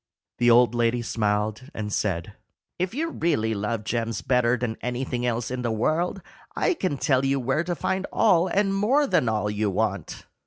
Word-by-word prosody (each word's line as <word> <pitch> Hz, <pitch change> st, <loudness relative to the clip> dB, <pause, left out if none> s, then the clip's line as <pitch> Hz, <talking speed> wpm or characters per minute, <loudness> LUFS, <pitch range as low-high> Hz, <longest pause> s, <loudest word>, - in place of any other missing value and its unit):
The 120 Hz, -, +4 dB
old 120 Hz, -1 st, +5 dB
lady 120 Hz, 0 st, +1 dB
smiled, 105 Hz, +2 st, -1 dB
and 105 Hz, -1 st, -4 dB
said, 90 Hz, -5 st, -1 dB, 0.5 s
"If 185 Hz, +5 st, -2 dB
you 325 Hz, +4 st, -1 dB
really 130 Hz, -, 0 dB
love 105 Hz, +2 st, -2 dB
gems 115 Hz, 0 st, -2 dB
better 125 Hz, -1 st, +2 dB
than 115 Hz, -2 st, -3 dB
anything 125 Hz, 0 st, -2 dB
else 120 Hz, 0 st, -2 dB
in 130 Hz, 0 st, -3 dB
the 120 Hz, -, -1 dB
world, 160 Hz, -, 0 dB, 0.3 s
I -, -, +2 dB
can 185 Hz, -, -2 dB
tell 130 Hz, -2 st, +2 dB
you 135 Hz, 0 st, +1 dB
where 135 Hz, +5 st, 0 dB
to 175 Hz, 0 st, -2 dB
find 190 Hz, +3 st, -2 dB
all 185 Hz, -5 st, +4 dB
and 195 Hz, +2 st, +1 dB
more 240 Hz, +9 st, +3 dB
than 125 Hz, -, +2 dB
all 105 Hz, -1 st, 0 dB
you 105 Hz, 0 st, 0 dB
want." 100 Hz, +1 st, -2 dB
120 Hz, 185 wpm, -25 LUFS, 110-165 Hz, 0.5 s, old